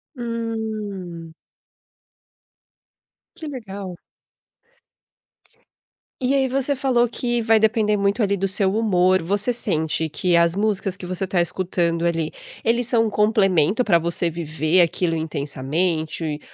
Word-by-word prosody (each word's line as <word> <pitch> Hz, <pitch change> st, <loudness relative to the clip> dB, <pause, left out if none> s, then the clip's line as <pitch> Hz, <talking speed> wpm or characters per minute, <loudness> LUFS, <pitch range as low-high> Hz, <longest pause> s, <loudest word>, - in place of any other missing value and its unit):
Hum. 215 Hz, -8 st, -5 dB, 2.0 s
Que 315 Hz, -, -8 dB
legal. 200 Hz, -9 st, -7 dB, 2.3 s
E 255 Hz, +1 st, +1 dB
aí, 270 Hz, -1 st, +2 dB
você 275 Hz, +2 st, 0 dB
falou 250 Hz, -2 st, +2 dB
que 240 Hz, 0 st, -1 dB
vai 225 Hz, -1 st, +4 dB
depender 215 Hz, -1 st, +2 dB
muito, 200 Hz, +3 st, +1 dB
ali, 200 Hz, 0 st, +1 dB
do 195 Hz, +1 st, 0 dB
seu 190 Hz, 0 st, +1 dB
humor. 185 Hz, -4 st, +3 dB
Você 200 Hz, +7 st, +1 dB
sente 160 Hz, -9 st, -1 dB
que 175 Hz, +3 st, 0 dB
as 170 Hz, 0 st, +3 dB
músicas 200 Hz, -2 st, 0 dB
que 185 Hz, -, -9 dB
você 185 Hz, +1 st, -3 dB
tá 180 Hz, -1 st, +1 dB
escutando 170 Hz, -1 st, -1 dB
ali, 165 Hz, -2 st, 0 dB, 0.3 s
eles 235 Hz, +1 st, +1 dB
são 230 Hz, -2 st, +2 dB
complemento 205 Hz, -2 st, +2 dB
pra 170 Hz, -7 st, +3 dB
você 170 Hz, +1 st, -1 dB
viver 160 Hz, +1 st, 0 dB
aquilo 170 Hz, 0 st, +1 dB
intensamente? 155 Hz, +1 st, -2 dB
190 Hz, 120 wpm, -22 LUFS, 170-225 Hz, 2.3 s, vai